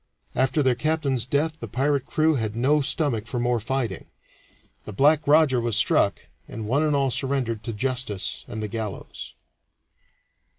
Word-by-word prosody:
After 135 +3 +1
their 130 -1 +3
captain's 140 -3 -1
death 155 +4 0
the - - -6
pirate 140 0 0
crew 155 +1 +2
had 110 -6 -2
no 140 +6 +2
stomach 135 -6 0
for 120 - -3
more 120 0 +1
fighting; 130 +1 -3 0.8
the - - -7
"Black 145 +8 +3
Roger" 145 -4 +4
was 115 -2 -1
struck, 105 -3 +3 0.3
and 110 -1 -6
one 135 +6 +2
and 150 -2 +2
all 135 -2 +1
surrendered 125 -5 -1
to - - -2
justice 125 -3 -2
and 110 -1 -5
the - - -2
gallows. 105 -1 -6
130 Hz, 160 wpm, -24 LUFS, 115-145 Hz, 0.8 s, Roger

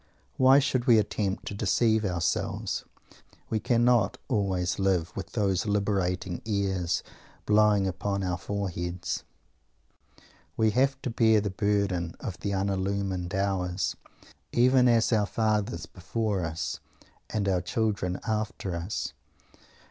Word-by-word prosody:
Why 130 +1 +7
should 130 -3 +1
we 120 -2 +7
attempt 105 -1 -1
to - - -4
deceive 110 +2 +2
ourselves? 90 -4 -1 0.7
We 110 - +1
cannot 120 -3 +3
always 95 -6 0
live 95 -2 +1
with - - -6
those 100 -2 +1
liberating 95 -3 0
airs 95 -5 -1 0.4
blowing 105 -1 +4
upon 100 +2 -2
our 90 -1 -1
foreheads. 90 -3 -3 1.3
We 110 -1 +3
have 135 +5 +2
to 125 - -2
bear 110 -2 +4
the 100 -1 -2
burden 100 -4 0
of 85 -3 -6
the 100 - -3
unillumined 95 -1 -1
hours, 95 -2 -1 0.6
even 125 +1 +5
as 115 0 +3
our 105 -2 +2
fathers 105 -6 0
before 95 +4 -2
us, 80 0 -3 0.5
and 105 -2 -1
our 95 -2 +2
children 95 -2 -1
after 110 -4 -2
us. 85 +5 -3
100 Hz, 120 wpm, -28 LUFS, 90-110 Hz, 1.3 s, Why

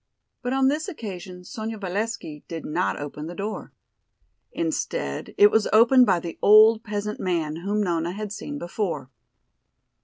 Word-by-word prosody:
But 245 - -3
on 265 0 +3
this 300 +5 0
occasion 185 - -8
Sonya 220 +3 -6
Valesky 200 -5 -4
did 165 -2 -6
not 170 +4 -1
open 145 +1 -6
the 175 - -7
door. 205 +3 -5 0.8
Instead 335 +9 -3
it 415 0 +7
was 220 - +3
opened 245 +3 +6
by 185 -3 +3
the 170 -1 -7
old 220 +2 +7
peasant 210 -1 -4
man 160 -4 -1
whom 205 +4 -1
Nona 170 -2 -1
had 210 0 -5
seen 290 +6 -6
before. 175 - -3
205 Hz, 150 wpm, -24 LUFS, 175-230 Hz, 0.8 s, it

